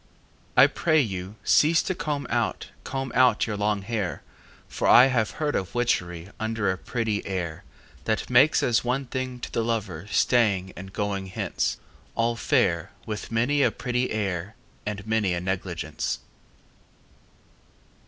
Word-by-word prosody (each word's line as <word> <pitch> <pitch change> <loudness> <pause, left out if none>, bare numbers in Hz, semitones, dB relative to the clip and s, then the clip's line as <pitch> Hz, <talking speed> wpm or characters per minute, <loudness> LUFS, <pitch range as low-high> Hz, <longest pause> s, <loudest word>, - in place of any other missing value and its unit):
I - - +10
pray 155 -3 +2
you, 95 -5 -2
cease 160 +2 +4
to 185 - -1
comb 145 -5 -3
out, - - -1
Comb 135 -1 -4
out 130 0 +4
your 110 - -3
long 105 -1 0
hair, 100 -8 -3 0.4
For - - -2
I 125 - +9
have 110 -3 +2
heard 150 -1 0
of 95 - -3
witchery 90 -8 -1
Under 110 -3 0
a 95 - -3
pretty 110 -4 -2
air, 90 -5 -4 0.4
That 110 -1 0
makes 130 +5 +5
as 120 -2 +2
one 130 +3 -1
thing 130 -1 -4
to - - -6
the 115 - 0
lover 105 -6 -3
Staying 100 -8 +2
and 95 +1 -9
going 100 -2 -2
hence, 95 - -2 0.4
All 115 0 +1
fair, 85 -7 +1 0.2
with 105 +1 -5
many 125 +6 +2
a - - +5
pretty 125 0 -2
air 100 -1 -2 0.3
And 100 -1 -4
many 110 -5 +1
a - - -1
negligence. 90 -2 -3
110 Hz, 150 wpm, -26 LUFS, 95-125 Hz, 0.4 s, I